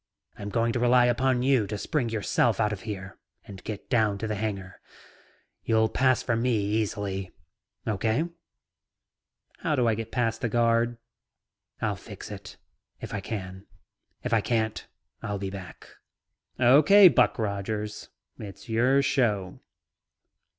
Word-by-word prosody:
I'm 100 Hz, 0 st, -6 dB
going 115 Hz, +2 st, +1 dB
to 120 Hz, -, -1 dB
rely 125 Hz, 0 st, +5 dB
upon 125 Hz, +1 st, +2 dB
you 130 Hz, -6 st, +3 dB
to 105 Hz, -, -4 dB
spring 125 Hz, +2 st, -1 dB
yourself 110 Hz, +1 st, +1 dB
out 105 Hz, -1 st, +2 dB
of 100 Hz, -, -7 dB
here 95 Hz, -2 st, -7 dB, 0.3 s
and 100 Hz, -2 st, -11 dB
get 105 Hz, -2 st, -6 dB
down 110 Hz, -5 st, +2 dB
to 110 Hz, -, -4 dB
the 110 Hz, -, -2 dB
hangar. 100 Hz, -3 st, -4 dB, 0.8 s
You'll 110 Hz, -1 st, +2 dB
pass 130 Hz, +2 st, +2 dB
for 120 Hz, -, 0 dB
me 120 Hz, +1 st, +1 dB
easily. 100 Hz, -2 st, -2 dB, 0.6 s
Okay?" 110 Hz, -, 0 dB, 1.3 s
"How 160 Hz, -5 st, 0 dB
do 125 Hz, -3 st, +2 dB
I 115 Hz, -, +3 dB
get 115 Hz, +1 st, -5 dB
past 120 Hz, -3 st, -1 dB
the 115 Hz, -, 0 dB
guard?" 115 Hz, +1 st, +2 dB, 0.8 s
"I'll -, -, 0 dB
fix -, -, -10 dB
it. -, -, -9 dB, 0.4 s
If -, -, -7 dB
I 105 Hz, -, -2 dB
can't, 95 Hz, -2 st, -6 dB, 1.5 s
I'll 105 Hz, -3 st, -3 dB
be 95 Hz, -1 st, -4 dB
back." 95 Hz, -3 st, -10 dB, 0.7 s
"Okay, 150 Hz, +11 st, +7 dB
Buck 125 Hz, -10 st, +3 dB
Rogers. 105 Hz, 0 st, -3 dB, 0.3 s
It's 100 Hz, +1 st, -9 dB
your 125 Hz, +5 st, +3 dB
show." 105 Hz, -9 st, 0 dB
110 Hz, 135 wpm, -27 LUFS, 100-120 Hz, 1.5 s, Okay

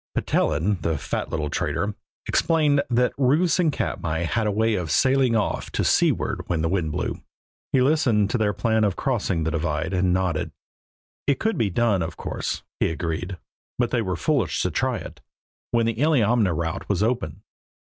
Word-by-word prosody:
Petellin, 90 Hz, +6 st, +1 dB
the 80 Hz, -1 st, 0 dB
fat -, -, -3 dB
little 75 Hz, -2 st, -2 dB
trader, 105 Hz, +1 st, -1 dB, 0.3 s
explained 150 Hz, -3 st, +3 dB
that 125 Hz, 0 st, +2 dB
roofs 155 Hz, +8 st, +3 dB
in 170 Hz, -3 st, +3 dB
Katmai 80 Hz, -, -2 dB
had 110 Hz, +6 st, 0 dB
a -, -, +1 dB
way 110 Hz, +2 st, +1 dB
of 90 Hz, -5 st, -2 dB
sailing 130 Hz, -, +3 dB
off 105 Hz, -, -1 dB
to -, -, 0 dB
seaward -, -, +2 dB
when 85 Hz, -3 st, 0 dB
the -, -, +2 dB
wind 85 Hz, -4 st, 0 dB
blew. -, -, -3 dB, 0.5 s
He 130 Hz, -, +4 dB
listened 125 Hz, -8 st, +2 dB
to 125 Hz, -, 0 dB
their 105 Hz, -1 st, +2 dB
plan 110 Hz, +1 st, +1 dB
of 100 Hz, -3 st, +1 dB
crossing 100 Hz, -, -1 dB
the 80 Hz, -, -1 dB
divide 80 Hz, +1 st, -2 dB
and 90 Hz, 0 st, +2 dB
nodded. 90 Hz, -3 st, -1 dB, 0.7 s
It 140 Hz, -2 st, +2 dB
could 225 Hz, 0 st, 0 dB
be 110 Hz, -, +1 dB
done, 105 Hz, -1 st, +1 dB
of 80 Hz, 0 st, -4 dB
course, -, -, -4 dB, 0.2 s
he -, -, +2 dB
agreed, 85 Hz, +3 st, -3 dB, 0.4 s
but 120 Hz, -1 st, 0 dB
they 120 Hz, -, +1 dB
were 95 Hz, -4 st, -2 dB
foolish 115 Hz, -, 0 dB
to -, -, 0 dB
try -, -, 0 dB
it, -, -, -10 dB, 0.5 s
when 115 Hz, -1 st, +2 dB
the 115 Hz, -, +1 dB
Illiamna 120 Hz, -, +3 dB
route 85 Hz, +3 st, -3 dB
was 100 Hz, 0 st, +1 dB
open. 115 Hz, -10 st, -2 dB
105 Hz, 180 wpm, -24 LUFS, 85-125 Hz, 0.7 s, He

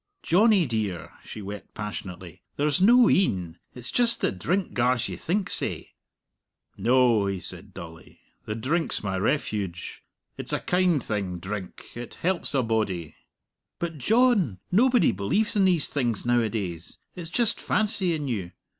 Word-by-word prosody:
"Johnnie 200 Hz, 0 st, +4 dB
dear," 105 Hz, -, -3 dB
she 105 Hz, -, -8 dB
wept 100 Hz, +1 st, -8 dB
passionately, 95 Hz, -5 st, -7 dB, 0.2 s
"there's 150 Hz, +3 st, +1 dB
no 240 Hz, +4 st, +7 dB
een! 90 Hz, -, +1 dB, 0.2 s
It's 125 Hz, -1 st, -5 dB
just 240 Hz, -1 st, +2 dB
the -, -, +1 dB
drink 170 Hz, -, -1 dB
gars 125 Hz, 0 st, +1 dB
you -, -, -5 dB
think 190 Hz, +3 st, -1 dB
sae." -, -, -1 dB, 0.8 s
"No," 120 Hz, -4 st, +3 dB
he 95 Hz, -1 st, -2 dB
said -, -, -8 dB
dully; 80 Hz, -1 st, -11 dB, 0.3 s
"the 105 Hz, -, -3 dB
drink's 150 Hz, +8 st, -1 dB
my 95 Hz, -2 st, -2 dB
refuge. 100 Hz, -, -2 dB, 0.4 s
It's -, -, -2 dB
a -, -, +1 dB
kind 180 Hz, -6 st, +1 dB
thing, 100 Hz, -4 st, -3 dB
drink 95 Hz, +2 st, -7 dB
it 120 Hz, 0 st, -8 dB
helps 180 Hz, -4 st, 0 dB
a 130 Hz, -, +3 dB
body." 105 Hz, -8 st, -1 dB, 0.6 s
"But, 165 Hz, -3 st, -4 dB
John, 215 Hz, -, +3 dB
nobody 245 Hz, +5 st, +4 dB
believes 100 Hz, -, 0 dB
in 200 Hz, -2 st, +4 dB
these 175 Hz, -5 st, +3 dB
things 120 Hz, -7 st, -1 dB
nowadays. 110 Hz, -8 st, -1 dB, 0.2 s
It's 170 Hz, -2 st, -5 dB
just 235 Hz, +3 st, 0 dB
fancy 200 Hz, -5 st, +1 dB
in 150 Hz, -2 st, -4 dB
you. 95 Hz, -8 st, -3 dB
120 Hz, 145 wpm, -26 LUFS, -, 0.8 s, no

